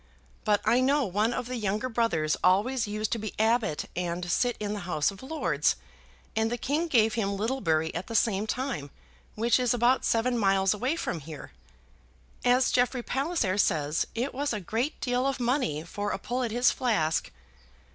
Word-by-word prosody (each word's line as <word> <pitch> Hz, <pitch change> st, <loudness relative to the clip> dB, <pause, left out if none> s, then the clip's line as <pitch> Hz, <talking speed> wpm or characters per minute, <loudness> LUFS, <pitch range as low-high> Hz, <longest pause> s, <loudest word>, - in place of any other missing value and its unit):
But 210 Hz, -2 st, +3 dB
I 245 Hz, -, +4 dB
know 275 Hz, +3 st, +3 dB
one 210 Hz, +4 st, +1 dB
of 245 Hz, -, -3 dB
the 250 Hz, +1 st, -4 dB
younger 210 Hz, +2 st, -1 dB
brothers 225 Hz, -11 st, +1 dB
always 215 Hz, +7 st, +3 dB
used 215 Hz, +1 st, -2 dB
to 230 Hz, -, 0 dB
be 215 Hz, -1 st, -5 dB
abbot 220 Hz, -6 st, +1 dB
and 175 Hz, 0 st, -2 dB
sit 245 Hz, -1 st, +1 dB
in 210 Hz, -1 st, -2 dB
the 210 Hz, -, -4 dB
House 155 Hz, +1 st, +1 dB
of 195 Hz, -, -12 dB
Lords. 260 Hz, -, 0 dB, 0.6 s
And 220 Hz, +1 st, +1 dB
the 240 Hz, -, -1 dB
king 300 Hz, +7 st, -1 dB
gave 225 Hz, -7 st, +3 dB
him 200 Hz, -4 st, -1 dB
Littlebury 180 Hz, -9 st, 0 dB
at 175 Hz, +2 st, -4 dB
the 230 Hz, -, -5 dB
same 215 Hz, -2 st, +2 dB
time, 240 Hz, -, -3 dB, 0.5 s
which 235 Hz, +3 st, +2 dB
is 250 Hz, -1 st, +2 dB
about 245 Hz, +2 st, +3 dB
seven 235 Hz, +1 st, +1 dB
miles 195 Hz, -1 st, +3 dB
away 255 Hz, +9 st, -1 dB
from 175 Hz, -, -3 dB
here. 155 Hz, 0 st, -9 dB, 0.9 s
As 250 Hz, +1 st, +4 dB
Jeffrey 245 Hz, 0 st, +1 dB
Palliser 265 Hz, -, 0 dB
says, 150 Hz, -4 st, +1 dB
it 245 Hz, +5 st, -2 dB
was 280 Hz, 0 st, -1 dB
a 210 Hz, -, -2 dB
great 225 Hz, -, -2 dB
deal 250 Hz, +1 st, +1 dB
of 275 Hz, -1 st, -1 dB
money 240 Hz, -, 0 dB
for 205 Hz, +4 st, -4 dB
a -, -, -1 dB
pull 245 Hz, +6 st, -3 dB
at 240 Hz, -, -1 dB
his 245 Hz, +3 st, +3 dB
flask. 200 Hz, -11 st, 0 dB
225 Hz, 185 wpm, -28 LUFS, 195-250 Hz, 0.9 s, I